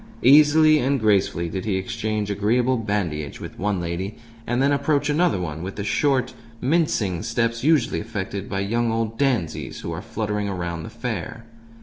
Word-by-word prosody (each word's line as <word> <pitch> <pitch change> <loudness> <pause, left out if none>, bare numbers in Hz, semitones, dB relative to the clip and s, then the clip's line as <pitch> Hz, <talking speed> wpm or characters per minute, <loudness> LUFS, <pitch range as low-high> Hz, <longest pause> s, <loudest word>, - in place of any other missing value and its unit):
Easily 155 +3 +6
and 135 +1 +1
gracefully 100 -5 +2
did 95 +2 -4
he 105 -3 0
exchange 105 +2 -2
agreeable 120 +6 +2
bandinage 95 - -2
with - - -9
one 100 -1 0
lady, 85 +4 -4 0.3
and 120 +1 0
then 140 +2 +3
approach 145 +1 +1
another 165 - +2
one 80 -3 -4
with 95 +2 -5
the 100 - -4
short, 130 +6 +1 0.3
mincing 125 - +1
steps 115 +1 -1
usually 150 -5 +3
affected 100 -3 -5
by 95 0 -1
young 115 +3 0
old 115 0 -1
dandies 125 - -1
who 85 - -5
are 80 +2 -4
fluttering 105 -2 -3
around 85 -3 -3
the 110 - -7
fair. 115 -1 -5
110 Hz, 165 wpm, -23 LUFS, 95-130 Hz, 0.3 s, Easily